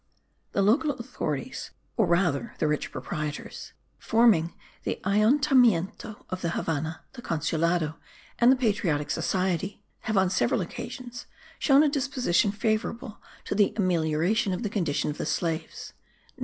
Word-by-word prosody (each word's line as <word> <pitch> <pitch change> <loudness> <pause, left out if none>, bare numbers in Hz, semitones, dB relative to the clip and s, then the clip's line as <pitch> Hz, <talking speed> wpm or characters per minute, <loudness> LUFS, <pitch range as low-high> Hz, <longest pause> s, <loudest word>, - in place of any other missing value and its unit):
The 200 - +2
local 245 +10 +3
authorities, 230 - -4 0.3
or - - +2
rather 170 -7 +1
the - - +1
rich 150 0 -1
proprietors, 150 -1 -5 0.3
forming 220 -8 +3 0.3
the - - -3
Ayuntamiento 220 - +2
of 185 0 -3
the 170 - -1
Havannah, 160 -1 -2
the 255 - -9
Consulado 165 -1 0 0.4
and 240 +1 +6
the - - +5
Patriotic 195 - 0
Society, 190 +3 -1 0.2
have 220 -2 -2
on 190 -1 +3
several - - +1
occasions 245 -2 -7 0.3
shown 280 0 +5
a - - +4
disposition 260 - +1
favourable 215 +1 -2 0.2
to - - -2
the 205 +1 +2
amelioration 180 +2 +1
of 185 - -3
the 210 - -2
condition 165 -8 0
of 150 - -9
the - - -2
slaves. 165 -2 -3
195 Hz, 135 wpm, -27 LUFS, 165-230 Hz, 0.4 s, and